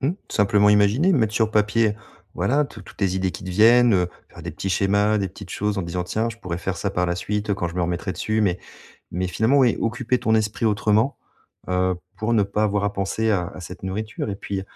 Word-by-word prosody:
Mmh. 140 +5 +1 0.2
Simplement 105 0 +3
imaginer. 105 - +4
Mettre 110 -8 +1
sur 110 -1 +2
papier 105 0 +2 0.4
voilà, 145 +3 +1
tout 115 - -11
toutes 95 - -15
les 95 -1 +1
idées 95 0 0
qui 95 - -9
te 95 - -5
viennent, 115 +5 +5
heu, 90 -3 +2 0.2
faire - - -12
des - - -5
petits 95 - -4
schémas, 100 +3 +2
des 95 -1 -1
petites 95 +1 -12
choses 105 0 -1
en 95 - -1
disant: 85 +1 -3
«Tiens 110 +5 -1
je 115 - -11
pourrais 90 -6 -4
faire 90 0 -4
ça 100 - -1
par 90 -2 0
la 85 -1 0
suite, 105 +4 -3
heu, - - +3
quand 90 -3 -2
je 85 - -9
me 90 - -1
remettrai 90 +2 -2
dessus» 110 0 -1
mais 95 -4 +1 0.5
mais 90 +2 -1
finalement 110 +9 +2
oui, 125 -4 +4
occuper 120 +2 0
ton 110 -2 +1
esprit 110 +1 0
autrement, 110 +4 +1 0.5
heu, 90 0 +1 0.2
pour 110 +2 -1
ne 105 - +4
pas 100 +2 -1
avoir 105 -1 0
à 100 - 0
penser 100 +3 -1
à 90 -4 0
à - - -10
cette 90 +2 -9
nourriture. 105 +3 -4
Et 100 - -4
puis, 100 -1 -4
105 Hz, 240 wpm, -23 LUFS, 95-110 Hz, 0.5 s, viennent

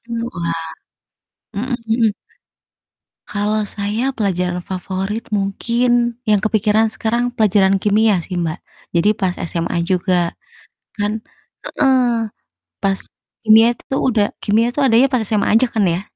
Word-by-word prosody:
Heeh - - -59
heeh, 230 0 -3
wah. 170 -1 -2 1.0
Mhm 245 +5 -2 0.2
mhm. 225 -2 +3 1.1
Kalau 210 +1 -1
saya 210 +6 -2
pelajaran 180 -5 -1
favorit 190 +4 -4
mungkin 235 +4 +1 0.2
yang 210 - +5
kepikiran 215 +1 +1
sekarang 235 +2 -1
pelajaran 195 -4 +3
kimia 210 -2 +3
sih, 180 +2 -6
Mbak. 165 -1 -2 0.3
Jadi 170 +4 +3
pas 185 -3 0
SMA 170 0 -2
juga 180 -1 0 0.6
kan 210 +2 -1 0.4
heeh, 250 -4 +2 0.6
pas 195 -1 +1 0.4
kimia 220 +1 +7
itu 270 - -6
udah 225 -6 +2 0.2
kimia 220 +3 +2
itu - - -1
adanya 255 0 +5
pas 255 -4 0
SMA 210 -1 0
aja 240 +3 +5
kan 220 - +1
ya? 170 +1 0
210 Hz, 130 wpm, -18 LUFS, 190-230 Hz, 1.1 s, kimia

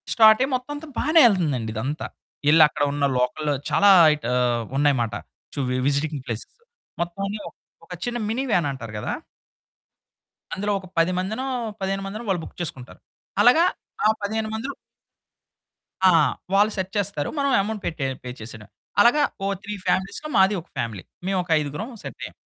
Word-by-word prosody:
స్టార్టయ్యి 220 +4 +6
మొత్తం 255 +3 -5
అంతా 305 +2 -8
బానే 315 +2 +4
యెళ్తుందండి 150 - +1
ఇదంతా. 135 +8 -3 0.4
యెళ్లి 155 +1 +7
అక్కడున్న 145 -1 0
లోకల్‌లో 125 +4 0 0.2
చాలా 205 - +5 0.3
ఇట్ 150 - -11
ఆహ్, 120 -2 +1
ఉన్నాయి 145 0 +3
మాట. 115 -1 -2 0.4
చు - - -4
వి 125 - 0
విజిటింగ్ 145 0 0
ప్లేసెస్ 115 -3 -6 0.5
మొత్తం 175 +3 -3
అన్నీ 210 +2 -4
ఒక - - -26 0.3
ఒక - - -7
చిన్న 240 0 -2
మిని 240 +4 -1
వ్యాన్ 175 -8 +2
అంటారు 115 -5 -8
కదా! 105 - -3 1.4
అందులో 205 +2 -1
ఒక 190 - -12
10 165 +2 +3
మందినో, 220 +8 -3 0.4
15 195 0 -1
మందినో 210 +4 -6
వాళ్ళు 180 -3 +1
బుక్ - - -11
చేసుకుంటారు. 130 -7 -6 0.4
అలాగా 250 +10 +6 0.4
ఆ - - +5
15 215 +2 -2
మందిలో 260 +6 -4 1.4
ఆ! - - +6 0.4
వాళ్ళు 205 +2 +4
సెట్ 190 0 -3
చేస్తారు. 200 -7 -1
మనం 280 -1 +1
ఎమౌంట్ 210 +1 -4
పెట్టె 155 -4 -2 0.2
పే 125 - -6
చేసేయడమే. 110 -2 -10 0.3
అలాగా 270 +7 +5 0.2
ఓ - - +1 0.2
3 210 - -5
ఫ్యామిలీస్‌లో 200 +11 -1
మాదీ 190 +2 +5
ఒక - - -24
ఫ్యామిలీ 115 -5 -3 0.2
మేము 195 0 +1
ఒక 175 - -19
ఐదుగురం 150 - -4
సెట్టయ్యాం. - - -7
185 Hz, 160 wpm, -23 LUFS, 140-215 Hz, 1.4 s, యెళ్లి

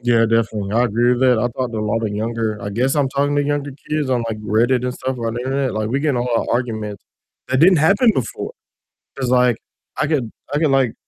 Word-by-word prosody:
Yeah, 120 -1 +3
definitely 110 -3 0
I 120 +2 +3
agree 120 +2 +2
with 125 - -1
that, 125 -3 +4
I - - 0
talk 125 -2 -2
to 110 - -3
a - - -1
lot 115 +2 -1
of 110 - 0
younger 110 +1 -2
I 100 - -5
guess 125 +6 0
I'm 140 -2 +2
talking 140 +2 0
to 145 - +3
younger 145 0 -1 0.2
kids 150 -3 -1
on, 120 -2 +1
like, 110 -1 -4
Reddit 115 +4 +1
and 125 - -1
stuff 130 0 -4
on 115 -1 -2
the 120 - -3
internet, 135 +1 -1
like, 110 0 -1
we 135 +4 0
get 150 0 +1
in 130 - -1
a 120 - 0
lot 120 -1 0
of - - -2
arguments 110 -4 -3 0.4
that 130 - +1
didn't 180 +5 +6
happen 200 - +4
before, 125 -3 -3 0.6
'cause 130 -2 -2
like 125 -2 +3 0.4
I - - +1
could 135 -8 -1 0.2
I 145 - +1
could, 155 -3 +2
like, 135 -4 +2
125 Hz, 255 wpm, -20 LUFS, 115-135 Hz, 0.6 s, didn't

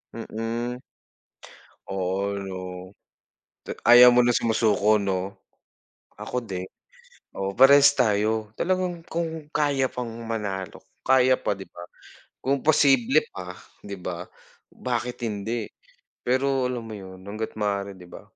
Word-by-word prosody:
Mm. 115 +2 -4 1.1
Oo, 95 +1 -2
'no? 95 -1 -5 1.1
Ta - - -4 0.2
ayaw 125 +1 +10
mo 125 - +6
na 120 - +3
sumusuko, 110 -2 +2
'no? 95 -1 -2 0.8
Ako 125 - -4
din. 95 -5 -5 0.7
Oo, 95 0 -4
parehas 140 +2 +8
tayo. 110 -1 +1
Talagang 180 +2 -1
kung 160 -2 -4
kaya 140 -3 +1
pang 125 -2 -5 0.2
manalo, 100 -6 -4 0.2
kaya 130 0 +4
pa, - - 0
di 95 - -8
ba? - - -13 0.6
Kung 135 0 -1
posible 140 -2 +4
pa, 90 -1 -7 0.3
di 100 -1 -7
ba? 90 -1 -5 0.5
Bakit 120 -1 -3
hindi, 110 +2 -3 0.6
pero 130 +1 +1
alam 120 -2 -4
mo 110 - -8
'yon 95 -2 -9
hangga't 110 +2 -5
maaari, 100 -2 -2
di 90 - -13
ba? 90 - -11
115 Hz, 125 wpm, -25 LUFS, 100-130 Hz, 1.1 s, ayaw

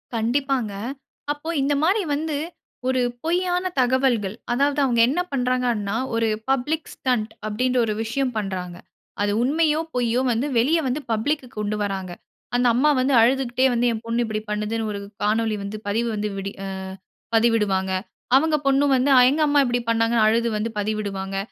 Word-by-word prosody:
கண்டிப்பாங்க. 245 -1 0 0.6
அப்போ 295 +2 -5
இந்தமாரி 300 +9 +2
வந்து 305 0 -2 0.5
ஒரு 260 0 +2 0.2
பொய்யான 355 +2 0
தகவல்கள். 245 -5 +2 0.2
அதாவது 280 +3 +1
அவுங்க 240 -4 +3
என்ன 295 - 0
பண்றாங்கன்னா, 245 -5 0 0.2
ஒரு 230 0 +1 0.2
பப்ளிக் 285 +4 0
ஸ்டண்ட் 235 -4 -1 0.2
அப்டின்ற 250 +4 0
ஒரு 215 - -1
விஷயம் 250 +3 -1
பண்றாங்க. 185 -4 -4 0.5
அது 205 0 +1
உண்மையோ! 305 +3 +2 0.2
பொய்யோ! 245 0 +1
வந்து 240 +5 0
வெளிய 300 +8 +3
வந்து 260 +4 -1
பப்ளிக்க்கு 255 +5 -1
கொண்டு 210 0 -1
வராங்க. 190 -2 -3 0.4
அந்த 245 0 +3
அம்மா 280 +5 +4
வந்து 265 +2 +2
அழுதுக்கிட்டே 255 +1 +2
வந்து 240 0 +1
என் 225 0 -4
பொண்ணு 230 +1 0
இப்டி 215 -1 -3
பண்ணுதுன்னு 210 +1 -2
ஒரு 200 - -4 0.2
காணொளி 220 +1 +1
வந்து 200 +2 -5
பதிவு 230 +3 0
வந்து 210 0 -2
விடி 195 0 -4
அ - - -4 0.7
பதிவிடுவாங்க. 210 -5 +2 0.4
அவுங்க 310 +3 +4
பொண்ணு 275 +1 +4
வந்து 260 +2 +2 0.2
எங்க 295 +4 0
அம்மா 290 0 +3
இப்டி 245 -1 0
பண்ணாங்கன்னு 230 0 +3
அழுது 230 +2 +2
வந்து 215 +2 -2
பதிவிடுவாங்க. 200 -2 -3
240 Hz, 150 wpm, -23 LUFS, 215-270 Hz, 0.7 s, அம்மா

